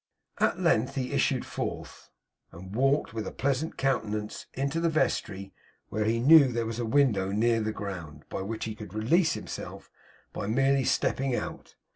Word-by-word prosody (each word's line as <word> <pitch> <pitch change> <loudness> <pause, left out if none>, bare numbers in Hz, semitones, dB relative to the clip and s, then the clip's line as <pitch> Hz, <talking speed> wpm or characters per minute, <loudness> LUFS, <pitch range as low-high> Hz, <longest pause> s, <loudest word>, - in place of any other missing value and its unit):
At - - +2
length 130 +5 +2
he 130 -2 -2
issued - - +1
forth, - - -6 0.4
and 95 +4 -10
walked 135 +2 +2
with 110 -1 -4
a - - -4
pleasant 140 +3 -1
countenance 110 -6 -2
into 140 +4 -1
the 170 0 +2
vestry; 100 -10 -1 0.4
where 105 0 -1
he 115 +1 +1
knew 145 +3 +8
there 115 -1 -1
was 115 +1 -4
a 120 - -1
window 110 -8 +2
near 115 +2 +2
the 110 0 -1
ground, 85 -8 -7
by - - -4
which 110 +3 -4
he 110 - -4
could 105 -2 -10
release 155 +10 +3
himself - - -7 0.4
by 100 - -4
merely 135 +3 +2
stepping 135 -2 +1
out. - - -6
115 Hz, 170 wpm, -28 LUFS, 105-135 Hz, 0.4 s, knew